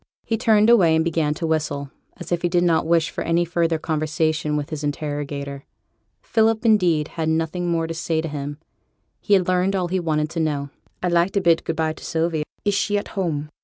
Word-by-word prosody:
He 225 - 0
turned 220 -2 +4
away, 185 -9 +5
and 160 0 +2
began 155 -3 0
to 165 - -3
whistle, 150 -3 -2 0.3
as - - -9
if 175 -1 0
he 175 - +1
did 175 0 +2
not 165 -2 +2
wish 165 -1 +2
for - - -4
any 170 +1 +1
further 170 -1 0
conversation 155 -1 -1
with 150 +2 -4
his 155 -1 -4
interrogator. 145 -1 -4 0.6
Philip, 225 +1 +1
indeed, 175 -9 +3
had 160 -1 -2
nothing 165 +2 -1
more 165 -1 0
to 165 - -4
say 160 0 -1
to 160 - -2
him: 145 -1 -5 0.6
he 205 - +3
had 185 -2 +1
learned 185 +2 +1
all 180 -2 -1
he 185 +1 0
wanted 155 -2 -1
to 165 - -3
know. 145 -3 -1 0.3
'I'd 180 - +1
like 170 +2 +3
to 200 - +2
bid 170 -2 +3
good 165 - -2
by 160 -1 0
to - - -14
Sylvie. 160 -1 -1 0.2
Is 205 - +2
she 205 +1 +1
at 205 - -4
home?' 155 -7 -2
165 Hz, 215 wpm, -22 LUFS, 155-180 Hz, 0.6 s, away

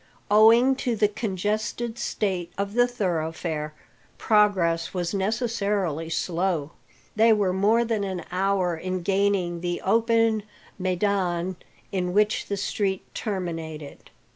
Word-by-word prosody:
Owing 230 +5 +6
to 245 -4 -1
the 210 -1 +3
congested 215 +3 -3
state 185 -5 -2
of 200 +1 -2
the 245 +1 +4
thoroughfare, 160 -7 -3 0.4
progress 190 -6 +2
was 175 0 -2
necessarily 200 - -1
slow. 170 -3 -1 0.4
They 225 +1 +5
were 200 -4 +1
more 215 +5 +3
than 225 -3 -1
an 190 -3 -4
hour 185 -1 +1
in 185 +2 -4
gaining 190 -3 +1
the 175 0 -2
open 225 +1 +3 0.4
maidan 185 -1 0 0.4
in 180 -2 -1
which 210 +2 +2
the 200 - -2
street 195 -1 -1
terminated. 165 -7 -5
195 Hz, 115 wpm, -25 LUFS, 175-215 Hz, 0.4 s, Owing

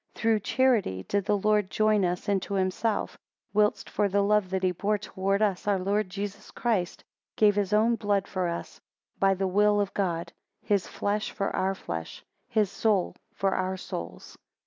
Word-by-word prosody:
7 - - -14
Through 225 -1 +3
charity 210 - +1
did 200 -1 0
the 205 - +2
Lord 210 -1 +2
join 215 -1 +2
us 180 +3 -1
into 200 0 0
himself; 195 +3 -1 0.3
whilst 210 0 +2
for 205 - 0
the 200 +1 +2
love 210 -2 +2
that 190 0 -2
he 185 - +3
bore 205 +4 0
towards 195 0 -1
us, 200 -2 0
our 200 -1 +3
Lord 200 +2 0
Jesus 200 +1 -6
Christ 205 -8 -1 0.3
gave 210 -2 +4
his 200 -2 0
own 225 +2 +3
blood 205 -2 0
for 185 -2 -1
us, 170 0 -6 0.4
by 195 0 +4
the 190 +1 -1
will 205 +2 +3
of 200 -1 -1
God; 170 -4 -2 0.3
his 200 -3 +1
flesh 210 +1 -2
for 195 - -3
our 190 +1 0
flesh; 80 - -6 0.2
his 215 -5 +1
soul 200 -3 +1 0.2
for 195 -1 +1
our 185 0 -1
souls. 85 - -7
200 Hz, 180 wpm, -27 LUFS, 185-210 Hz, 0.4 s, gave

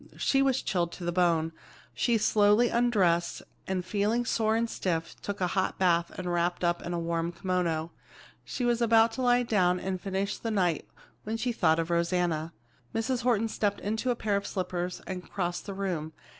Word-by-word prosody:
She 270 - +2
was 270 -1 +2
chilled 175 -3 0
to 180 - -8
the 175 - 0
bone. 170 -2 +2 0.4
She 235 -2 +2
slowly 210 +2 +4
undressed, 195 -8 +2 0.2
and 185 -2 -2
feeling 215 +5 0
sore 220 -2 +1
and 230 +1 +1
stiff, 165 -7 -2
took 205 0 -4
a 185 - +2
hot 190 - 0
bath 170 -2 +2
and 180 -1 -3
wrapped 175 +1 0
up 175 0 +1
in 175 - -5
a - - -1
warm 170 0 -1
kimono. 170 -3 -1 0.5
She 250 - -3
was 240 0 +1
about 225 0 +5
to 260 - -5
lie 245 0 +4
down 180 -6 +2
and 185 -1 -3
finish 195 +1 -2
the 230 - -3
night 180 -7 0 0.3
when 220 +2 -3
she 245 +2 -1
thought 160 -8 +2
of 165 +1 -1
Rosanna. 170 -2 0 0.4
Mrs. 240 +2 0
Horton 230 -2 +2
stepped 205 -2 -1
into 220 +5 -2
a 245 - +2
pair 215 -3 -1
of 200 - -1
slippers 180 -1 -3
and 185 -1 -6
crossed 175 -1 -3
the 200 - -4
room. 175 -5 -3
190 Hz, 190 wpm, -29 LUFS, 175-225 Hz, 0.5 s, about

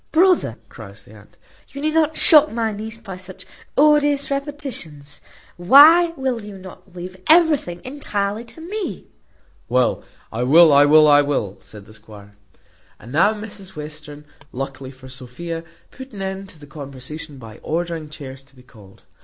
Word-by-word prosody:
"Brother," 345 - +2
cries 100 -3 -13
the 105 - -18
aunt, 105 -1 -18 0.3
"you 280 - -10
need 310 +2 -1
not 315 -1 +1
shock 305 -1 +6
my 225 -1 -2
niece 215 +2 -7
by 195 -5 -10
such 185 0 -10 0.3
odious 290 -1 +3
repetitions. 270 - -6 0.4
Why 300 - +7
will 260 -3 -2
you 205 -1 -10
not 185 0 -14
leave 180 +1 -8
everything 305 - +3
entirely 220 -6 -3
to 320 - -13
me?" 395 +4 -6 0.6
"Well, 125 +1 +2 0.3
well, 145 +8 +5
I 140 +1 +6
wull, 155 +1 +6
I 145 0 +6
wull," 135 -9 -3
said 105 -2 -14
the 110 - -16
squire. 105 -1 -15 0.6
And 115 - -13
now 205 +9 +3
Mrs 205 -3 -10
Western, 150 -1 -9 0.3
luckily 135 0 -6
for 130 0 -14
Sophia, 130 +6 -7 0.3
put 260 -2 -12
an 195 -2 -6
end 190 0 -6
to 165 - -16
the 145 - -13
conversation 140 +1 -9
by 115 -4 -12
ordering 165 -1 -4
chairs 135 -3 -10
to 135 0 -27
be 125 - -18
called. 105 -6 -19
170 Hz, 160 wpm, -20 LUFS, -, 0.6 s, Why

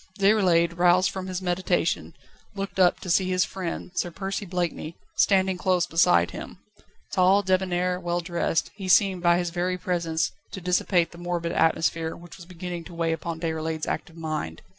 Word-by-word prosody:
Déroulède, 180 -4 +3
roused 180 +1 +4
from 190 -1 -5
his 185 0 -4
meditation, 180 +1 0 0.4
looked 195 -1 -5
up, 180 -2 +4
to - - -8
see 185 +1 +3
his 185 0 +2
friend, 180 -1 -5
Sir 180 - -1
Percy 195 +3 -4
Blakeney, 170 -2 -3 0.2
standing 190 -2 +3
close 180 -2 +2
beside 85 - +3
him. - - -8 0.5
Tall, 190 +2 +4
débonnair, 180 -1 0
well 175 0 -1
dressed, 170 -2 -1
he 195 -2 -7
seemed 190 -1 +4
by 175 0 +4
his 175 -1 -1
very 180 +1 -1
presence 170 -3 -1 0.2
to - - -5
dissipate 180 -1 +1
the 170 - -12
morbid 175 -1 -2
atmosphere 160 0 +1
which 175 -1 -13
was 175 -2 -12
beginning 175 -1 -6
to 175 - -11
weigh 165 -1 0
upon 165 0 -5
Déroulède's 160 -1 -2
active 165 -1 -4
mind. 155 - -4
175 Hz, 170 wpm, -25 LUFS, 165-185 Hz, 0.5 s, roused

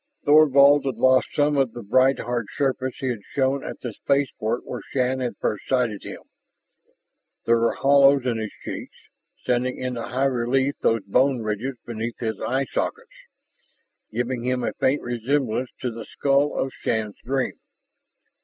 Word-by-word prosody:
Thorvald 145 -1 +6
had 130 - -1
lost 130 +2 +4
some 145 0 +2
of 135 -4 +1
the 120 - -8
bright 130 +6 +3
hard 120 -3 -3
surface 130 -2 -1
he 130 - -2
had 115 -4 -3
shown 135 0 +1
at - - -7
the 120 -3 -5
spaceport 125 -3 -1
where - - -6
Shann 130 0 0
had 125 -2 -3
first 105 - -3
sighted 125 -6 0
him. - - -8 1.2
There 115 0 +4
were 115 - +2
hollows 140 -1 +5
in 120 -3 0
his 110 -1 -4
cheeks, - - -6 0.5
sending 125 +1 0
into 125 -2 -3
high 130 +4 -1
relief 130 +2 +1
those 115 -2 +1
bone 125 +5 +2
ridges 110 +5 -3
beneath 115 0 -4
his 110 -2 -3
eye 135 +2 0
sockets, - - -3 1.0
giving 120 +1 -2
him 125 0 -1
a - - -1
faint 135 +3 0
resemblance 125 0 -1
to 125 - -2
the 115 0 -8
skull 140 +1 +1
of 135 - -1
Shann's 110 -2 -2
dream. 130 +1 -2
125 Hz, 160 wpm, -24 LUFS, 115-135 Hz, 1.2 s, Thorvald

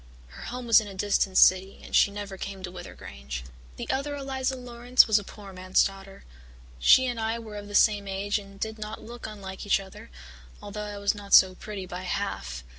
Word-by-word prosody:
Her 65 - -12
home 250 0 -6
was 230 -1 +6
in 215 - -8
a 195 - -9
distant 195 -1 +1
city 185 +1 +5
and - - -5
she - - +6
never 200 -1 -7
came 195 0 -7
to 180 - -5
Wyther 175 -1 -9
Grange. 65 -2 -7 0.3
"The - - -6
other 285 +2 -2
Eliza 265 -1 -2
Laurance 245 0 +3
was 215 -1 +3
a - - -8
poor 200 0 -11
man's 185 0 +2
daughter. 195 0 -6 0.6
She 260 - +6
and 245 -2 -2
I 225 +1 -1
were 220 -2 -9
of 205 0 -7
the 205 - -6
same 205 -2 +4
age 200 +2 -1
and 195 -1 -14
did 220 +1 -4
not 215 +1 -7
look 235 0 -8
unlike 195 -3 -8
each 205 - +2
other, 190 -1 -12 0.5
although 210 +1 -6
I 205 -1 -6
was 200 0 +1
not 205 -1 +2
so 185 -1 +7
pretty 195 0 -7
by 180 0 -7
half. 180 - -4
205 Hz, 215 wpm, -27 LUFS, 190-220 Hz, 0.6 s, so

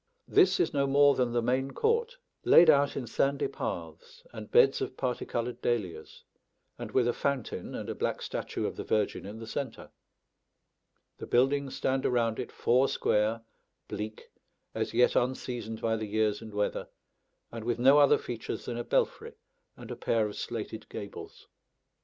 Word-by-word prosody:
This 390 -1 +4
is 365 - +1
no 140 -1 +1
more 140 +1 +5
than 125 -3 0
the 120 0 0
main 130 +3 0
court, 465 +2 0 0.3
laid 165 -2 +8
out 140 -1 +2
in 130 - -3
sandy 140 +4 0
paths 80 -2 -6
and 110 -2 -8
beds 135 - +5
of - - -4
parti 125 -2 -2
coloured 120 +1 -3
dahlias, 105 -8 -3 0.6
and - - -5
with 125 -2 +2
a 120 - +2
fountain 140 -5 -3
and - - -5
a - - -3
black - - -2
statue - - -4
of - - -4
the - - -4
Virgin 105 -2 -1
in 105 +2 -8
the 115 - -8
centre. 130 +1 -5 1.3
The - - -7
buildings 135 +2 +2
stand 130 0 0
around 115 -3 +1
it 125 - -5
four 130 +3 +2
square, 110 +2 +1 0.5
bleak, 110 +1 -6 0.4
as - - -2
yet 125 +1 +3
unseasoned 120 -3 -2
by 115 0 +1
the 110 -1 -4
years 105 0 0
and 110 -1 -9
weather, 105 0 -2 0.6
and 115 -1 -6
with 120 +1 -1
no 135 +4 +6
other 145 -1 +6
features 120 -2 -6
than 120 - -4
a 120 - -3
belfry - - -1 0.4
and - - -10
a - - -4
pair 115 -2 +1
of 105 - -5
slated - - -6
gables. - - -9
120 Hz, 170 wpm, -29 LUFS, 110-135 Hz, 1.3 s, laid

